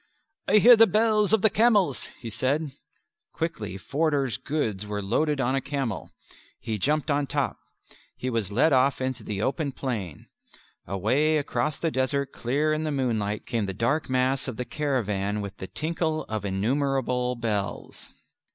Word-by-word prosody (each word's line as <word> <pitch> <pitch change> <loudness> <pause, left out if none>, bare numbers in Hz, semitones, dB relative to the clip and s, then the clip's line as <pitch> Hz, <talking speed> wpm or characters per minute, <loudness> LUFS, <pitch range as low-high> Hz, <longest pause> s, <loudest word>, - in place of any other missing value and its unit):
"I 210 - +5
hear 240 +3 +9
the 225 0 +7
bells 215 -2 +3
of 220 -3 +3
the 220 - +8
camels," 210 - +3
he 115 -2 -7
said. 135 +7 -1 0.6
Quickly 110 - -3
Forder's 140 - 0
goods 110 -10 -2
were 105 0 -3
loaded 140 +9 0
on 130 0 +1
a 135 - +1
camel. 135 -6 -3 0.5
He 110 -2 -3
jumped 150 - +1
on 140 0 +1
top. - - -1 0.6
He 130 - -4
was 115 -5 -1
led 140 +8 +3
off 130 +1 +3
into 130 0 -3
the 105 0 -3
open 140 0 -1
plain. 105 - -4 0.6
Away 130 - +2
across 150 0 -1
the 165 - -1
desert 135 +1 0
clear 145 +6 0
in 155 0 -1
the 155 - -1
moonlight 110 -7 -1
came 115 -4 -1
the 95 - -4
dark 125 +9 0
mass 130 +1 +1
of 125 -4 -5
the 125 - -3
caravan 105 -10 -1
with 100 -2 -6
the 95 - -6
tinkle 160 - -2
of 110 -2 -4
innumerable 125 +4 0
bells. 110 -4 -4
130 Hz, 160 wpm, -26 LUFS, 110-155 Hz, 0.6 s, hear